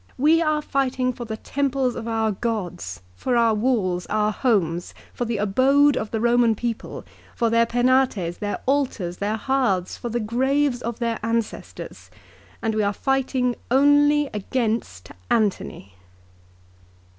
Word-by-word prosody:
" - - -34
We 330 +1 +4
are 305 -2 +1
fighting 260 -2 0
for 240 - -7
the 220 -1 -5
temples 270 -1 -1
of 230 - -6
our 225 -1 0
gods, 180 - -4
for 245 - 0
our 230 -1 +4
walls, 210 -6 0
our 210 0 +1
homes, 180 -9 0 0.2
for 245 - -3
the 230 -1 -2
abode 270 +8 +3
of 215 - -3
the 225 - -2
Roman 235 0 +3
people, 230 +1 -5 0.3
for 230 -2 +1
their 230 0 +3
Penates, 245 -8 +1
their 205 -1 -3
altars, 250 -11 -1
their 205 +2 -1
hearths, 225 -8 0
for 240 - -5
the 240 +1 -1
graves 260 +4 +1
of 235 0 -4
ancestors, 230 -1 -4 0.5
and 225 -1 0
we 215 - +1
are 200 0 +1
fighting 260 -1 0
only 290 +3 +4
against 215 - -2 0.2
Antony." 200 - -1
235 Hz, 145 wpm, -23 LUFS, 210-260 Hz, 0.5 s, We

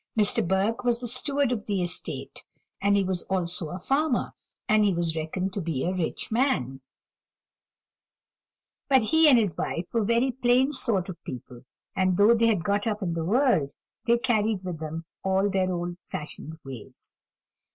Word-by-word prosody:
Mr. 205 -5 +4
Burke 195 +6 0
was 240 -1 +1
the 245 - -5
steward 275 +2 +1
of 215 -4 -3
the 195 -3 0
estate, 175 0 -3 0.4
and 200 0 +3
he 200 - +2
was 185 -2 -1
also 180 -3 0
a 180 - -5
farmer, 275 - 0 0.3
and 215 0 +4
he 205 - +3
was 170 -1 -1
reckoned 180 +4 -3
to 200 - -2
be 160 -6 -2
a 180 - 0
rich 180 +3 -2
man; 135 - 0 2.1
but 265 -4 +5
he 320 +7 +5
and 260 - +7
his 205 -9 +1
wife 170 +1 -3
were 230 -2 +2
very 235 +5 +2
plain 255 +3 +2
sort 225 -9 +2
of 185 -3 -8
people, 125 0 -9 0.3
and 185 -1 +1
though 205 +3 +6
they 230 0 +3
had 205 -7 +1
got 205 +2 0
up 210 -1 -2
in 170 -2 -1
the 165 -1 -2
world, 210 - +2 0.3
they 235 0 +5
carried 220 -5 0
with 180 -4 -5
them 160 +1 -5 0.2
all 195 +1 +1
their 185 -1 +1
old 175 0 -4
fashioned 155 +1 -6
ways. 130 -5 -7
195 Hz, 175 wpm, -26 LUFS, 175-235 Hz, 2.1 s, and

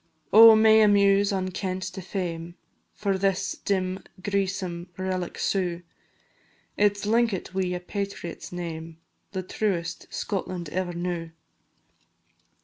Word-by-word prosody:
Oh, 225 +1 +10
may 220 0 +6
a 215 - +6
muse 200 0 +4
unkent 185 -1 -2
to 190 - -6
fame 175 -3 -4 0.4
For 195 -2 -1
this 195 0 +1
dim 190 -1 -1 0.2
greesome 190 -3 -2
relic 185 -1 -3
sue, 180 -3 -1 0.9
It 205 0 +3
's 200 - -6
linkit 225 -4 +1
wi' 185 -1 -1
a - - -3
patriot's 195 -2 -5
name, 165 -2 -6 0.4
The 190 -1 -3
truest 175 -4 -3
Scotland 185 -4 -3
ever 180 +1 -2
knew. 170 -1 -3
185 Hz, 120 wpm, -26 LUFS, 175-200 Hz, 0.9 s, Oh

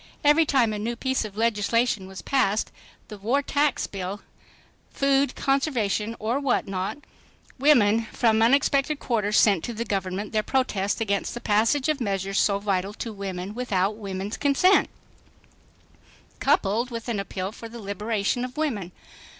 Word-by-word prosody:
Every 300 +2 +5
time 245 -7 +2
a 210 - -3
new 235 +3 -2
piece 260 -1 -1
of 210 -1 -9
legislation 225 -2 +1
was 190 0 -9
passed,—the 215 -3 -2
war 250 +8 +1
tax 290 0 +1
bill, 195 +1 -5 0.7
food 275 0 +1
conservation 230 -6 0
or 230 +5 -1
what 275 -6 0
not,—women 225 +3 0
from 220 -1 +1
unexpected 275 +4 +3
quarters 215 -5 0
sent 195 -6 +4
to 235 - -5
the 230 +2 -3
Government 195 0 -3
their 215 - +1
protest 210 -5 -1
against 200 0 -1
the - - -4
passage 230 +7 +2
of 305 -3 0
measures 195 -2 -1
so 200 -1 +3
vital 200 -1 -1
to 230 - -5
women 195 -1 -5
without 210 -4 0
women's 200 -1 -5
consent, 295 +7 +3 1.5
coupled 220 +5 +1
with 230 -1 -6
an 230 -4 -1
appeal 195 -1 -4
for 230 +1 -10
the 235 - -9
liberation 210 +2 -2
of 255 +2 -6
women. 225 - -2
220 Hz, 145 wpm, -25 LUFS, 200-255 Hz, 1.5 s, Every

